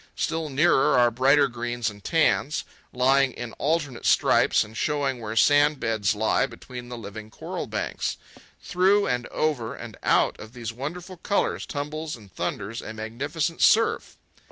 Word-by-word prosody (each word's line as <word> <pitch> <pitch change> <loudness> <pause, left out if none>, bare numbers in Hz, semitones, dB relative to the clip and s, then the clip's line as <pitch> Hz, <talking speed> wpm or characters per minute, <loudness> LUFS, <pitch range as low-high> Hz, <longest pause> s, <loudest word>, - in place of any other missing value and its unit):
Still 160 -1 -2
nearer 140 -1 +3
are 120 -1 +5
brighter 140 +4 +4
greens 120 -1 -3
and 105 -2 -6
tans, 155 -2 +1 0.3
lying 135 +1 +3
in 120 -2 -7
alternate 145 -4 -1
stripes - - +4
and 110 +1 -13
showing 140 -2 -1
where 110 0 -5
sandbeds 115 -7 +3
lie 110 +5 +1
between 125 0 -10
the 120 - -6
living 110 0 -9
coral - - -6
banks. - - -3 0.5
Through 195 +3 +3
and 125 -1 -1
over 140 -8 -1
and - - -9
out - - +2
of 110 +1 -11
these 115 -3 -6
wonderful 175 +9 -6
colours 200 +4 -1
tumbles 150 +2 -4
and 105 -5 -16
thunders 115 +4 -4
a 110 - -8
magnificent 140 +9 -3
surf. 225 +1 +3
130 Hz, 150 wpm, -25 LUFS, 115-150 Hz, 0.5 s, are